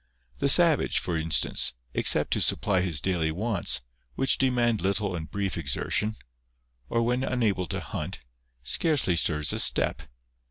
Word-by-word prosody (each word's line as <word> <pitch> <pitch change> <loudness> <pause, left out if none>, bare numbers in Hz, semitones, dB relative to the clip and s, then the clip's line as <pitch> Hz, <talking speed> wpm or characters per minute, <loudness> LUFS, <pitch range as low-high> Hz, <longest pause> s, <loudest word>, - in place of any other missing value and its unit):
The 140 - +1
savage, 165 0 +4
for 85 - -2
instance, 80 -4 +1 0.2
except - - +3
to - - 0
supply 95 -3 +2
his 85 -6 -1
daily 85 -3 0
wants, 95 - -2 0.3
which 135 - 0
demand 120 -5 +1
little 100 0 0
and 80 -2 -6
brief 100 -2 -3
exertion, 105 +8 -1 0.7
or 115 - 0
when 125 +2 0
unable 110 -9 -1
to - - -3
hunt, 85 +5 -6 0.5
scarcely 135 - +1
stirs 75 -2 0
a - - -2
step. - - +2
100 Hz, 145 wpm, -26 LUFS, 85-120 Hz, 0.7 s, savage